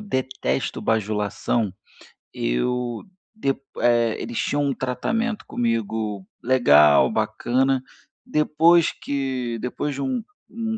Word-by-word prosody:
detesto 130 - -2
bajulação, 105 0 0 0.6
eu 120 - -1 0.3
depo 135 -12 -2 0.2
eh, 120 -2 +3
eles 115 0 -5
tinham 145 - 0
um 140 - +1
tratamento 220 - -2
comigo 110 -4 -2 0.2
legal, 75 - +6
bacana, 130 +2 +1 0.4
depois 160 +2 +4
que 130 -4 -3
depois 140 +3 -3
de 140 - -4
um 250 - -1 0.3
um 225 -1 -3
125 Hz, 100 wpm, -23 LUFS, 115-145 Hz, 0.6 s, legal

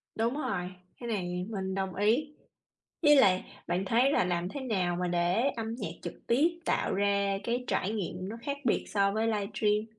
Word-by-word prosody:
Đúng 230 +3 +1
rồi, 180 -11 -2 0.3
cái 240 - -6
này 180 -3 -2
mình 190 -3 -3
đồng 190 -1 -2
ý. 240 +10 +2 0.7
Với 295 -2 +7
lại 190 -9 +5 0.2
bạn 185 +2 0
thấy 245 +7 +3
là 185 - +3
làm 175 0 -1
thế 280 - -5
nào 190 -9 0
mà 180 0 -1
để 175 +9 +2
âm 225 0 -3
nhạc - - -3
trực - - -5
tiếp 325 +8 +2
tạo - - +1
ra 200 0 +1
cái 240 +2 -1
trải 195 - 0
nghiệm 190 -3 -4
nó 225 - -5
khác 280 +3 -3
biệt 225 - +2
so 200 -1 +2
với 220 +2 0
livestream? 210 0 0
205 Hz, 190 wpm, -30 LUFS, 185-235 Hz, 0.7 s, Với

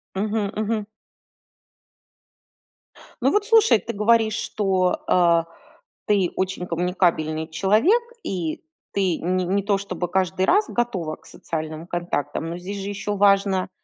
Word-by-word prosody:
Мгм, 205 0 -1
мгм. 215 0 -1 2.4
Ну 265 - +3
вот 415 0 +2
слушай, 450 - +5
ты 235 - -6
говоришь, 220 +1 +3
что, 190 -3 0
а, 170 -2 +4 0.6
ты 200 -4 +2
очень 185 -1 -2
коммуникабельный 165 -3 0
человек 215 - +3 0.2
и 170 -5 -3 0.3
ты 190 -4 +1
не 185 +2 -1
не 195 +3 0
то, 200 0 +1
чтобы 185 -3 -4
каждый 185 0 +1
раз 410 - +4
готова 190 -10 -2
к - - -26
социальным 160 +1 -6
контактам. 165 -2 -3
Но 170 - -5
здесь 195 +3 -6
же 195 - -4
ещё 205 0 -3
важно, 195 -2 +3
190 Hz, 130 wpm, -23 LUFS, 175-210 Hz, 2.4 s, слушай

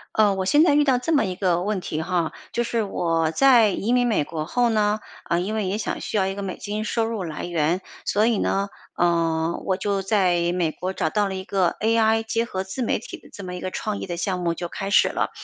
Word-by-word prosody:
呃， 210 -2 +4
我 190 -1 -2
现 295 +9 +5
在 295 -4 +4
遇 295 - +4
到 265 -3 +3
这 325 +6 -2
么 295 - +4
一 185 -1 -4
个 180 -3 +1
问 205 0 -1
题 155 -3 -4
哈， 165 -2 -1 0.2
就 240 - 0
是 230 -1 0
我 165 -5 0
在 240 +2 +5
移 215 +4 -1
民 245 0 +3
美 220 -10 +1
国 155 0 -5
后 245 +7 +2
呢， 210 -1 +2 0.3
啊 170 - 0
因 190 +5 -2
为 215 -3 -1
也 190 +2 -1
想 215 - -3
需 - - -4
要 190 -2 +2
一 195 - -2
个 200 - -5
美 190 -2 -4
金 210 +1 -4
收 225 +1 0
入 225 -3 -3
来 155 -3 -5
源， 170 +1 0 0.2
所 210 +2 +2
以 230 -3 +2
呢， 195 +1 0 0.3
呃 165 -1 +1
我 190 - +1
就 200 +1 -1
在 180 -4 +2
美 175 -3 0
国 185 +4 -4
找 160 - 0
到 205 +2 +1
了 190 - -4
一 190 0 -5
个 185 -2 0
ai 225 0 +3
结 225 +1 0
合 190 -4 -3
自 190 +7 -6
媒 235 - +1
体 - - -9
的 - - -18
这 200 - -9
么 180 -1 -6
一 180 - -6
个 185 - -4
创 210 +2 -3
意 - - -5
的 175 -2 -4
项 180 +1 -2
目 170 -1 0
就 175 - -4
开 195 +3 -5
始 - - +5
了。 - - -1
195 Hz, 285 characters per minute, -23 LUFS, 175-220 Hz, 0.3 s, 现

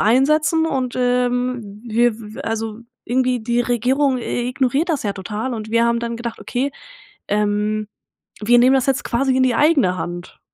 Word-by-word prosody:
einsetzen 305 +8 +3
und, 260 -5 -2
ähm 245 -3 -1
w 235 +1 +3
wir 220 +4 -9
also 225 0 -3 0.2
irgendwie 250 0 +1
die 235 +2 0
Regierung 255 +3 +1
i 245 +1 -2
ignoriert 270 +5 0
das 295 - -1
ja 205 - -1
total 210 +6 -4
und 220 -1 -6
wir 230 +1 +3
haben 235 0 +1
dann 235 0 -3
gedacht: 235 -1 -5
„Okay, 260 +3 -2 0.6
ähm, 210 +1 0 0.5
wir 240 +3 +4
nehmen 255 +2 +5
das 260 - +2
jetzt 270 -2 0
quasi 260 +2 0
in 260 - +3
die 250 -3 +2
eigene 280 - +3
Hand.“ 175 0 -6
240 Hz, 170 wpm, -20 LUFS, 220-260 Hz, 0.6 s, nehmen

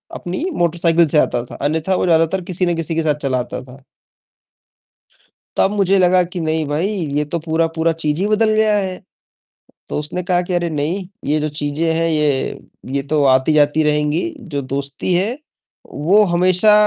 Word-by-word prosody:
अपनी 185 - -4
मोटरसाइकिल 170 -1 +2
से 150 +1 +4
आता 120 - 0
था - - -10
अन्यथा 160 +5 0
वो - - 0
ज़्यादातर 165 +2 +2
किसी 180 +1 0
ना 175 - +1
किसी 165 0 -3
के 165 - 0
साथ 150 -2 +2
चला 130 -2 +1
आता 125 - -5
था। 130 +2 -14 1.8
तब 195 - +3
मुझे 195 -1 +2
लगा 180 0 +4
कि 175 +1 -6
नहीं 160 -1 -1
भाई 155 +6 0 0.3
ये 150 - +1
तो 170 +3 -3
पूरा-पूरा 165 0 0
चीज़ 150 +2 0
ही 205 - +1
बदल 215 +1 +2
गया 215 -1 +3
है। 190 -2 -2 0.9
तो - - -3
उसने 160 +5 -3
कहा 180 0 +1
कि 180 - -5
"अरे 175 -1 0
नहीं, 160 +6 -2 0.2
ये 150 +2 +1
जो 155 - -1
चीजें 150 +3 -1
हैं 165 +1 +1
ये 150 -4 0 0.4
ये 140 - 0
तो 150 -2 +2
आती-जाती 145 +3 +3
रहेंगी। 150 +1 +1 0.3
जो 140 - -1
दोस्ती 140 +6 -2
है 205 +8 0 0.6
वो 190 +8 +3
हमेशा 185 +4 +4
165 Hz, 180 wpm, -18 LUFS, 150-180 Hz, 1.8 s, से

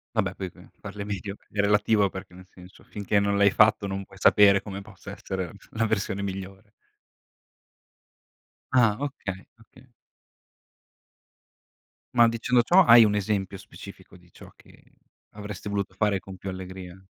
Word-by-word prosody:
Vabbè - - 0
poi 95 -2 -6
qui 90 +1 -18
parle 100 0 -7
medio, 100 -1 -5 0.2
è 105 - -7
relativo, 105 0 +3
perché 95 -1 -10
nel 95 0 -14
senso, 90 +1 -16
finché 100 0 -1
non 100 0 0
l'hai 100 -1 +4
fatto, 105 0 +3
non 95 0 -4
puoi 95 - -17
sapere 100 0 +5
come 100 -2 -7
possa 100 0 -12
essere 95 -2 -5
la - - -12
f - - -21
la 115 0 -1
versione 100 -2 -2
migliore. 95 +2 -7 2.0
Ah, 115 -5 +4
okay, 100 -9 -6
okay. 130 +3 -20 2.3
Ma, 120 -1 +6
dicendo 120 +2 +1
ciò, 180 +9 +5
hai 115 -3 +9
1 105 -1 +2
esempio 100 -1 -2
specifico, - - -13
di 90 0 -23
ciò - - -14
che - - -21 0.5
avresti 105 -1 -8
voluto 100 -1 -3
fare, 105 -3 +1
con 95 0 -11
più 95 - -7
allegria? 95 0 -9
100 Hz, 155 wpm, -25 LUFS, 95-105 Hz, 2.3 s, hai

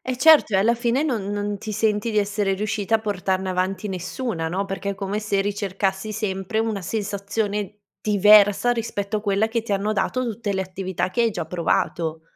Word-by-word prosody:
Eh 255 -1 -3
certo, 305 -6 +6
e - - +6
alla 225 +5 +3
fine 240 +3 0
non 245 -9 -1
non 205 0 -2
ti 215 - -6
senti 215 +1 0
di 215 - -3
essere 200 -1 0
riuscita 210 +1 -1
a - - -9
portarne 190 -2 -1
avanti 185 +3 -1
nessuna, 185 -1 -3
no? 190 +4 -1
Perché 195 0 -4
è - - -3
come 195 +1 -3
se 205 -2 0
ricercassi 200 0 -2
sempre 200 0 -2
una 220 -3 -1
sensazione 205 +1 -3 0.2
diversa 205 +1 +5
rispetto 215 -3 -2
a - - -7
quella 205 0 +1
che 230 0 -1
ti 220 - -4
hanno 200 +2 0
dato 205 +6 0
tutte 220 -2 -3
le 190 - 0
attività 185 -1 -3
che 235 - -1
hai 230 - +3
già 185 - -4
provato. 165 -1 -1
205 Hz, 195 wpm, -23 LUFS, 195-220 Hz, 0.2 s, certo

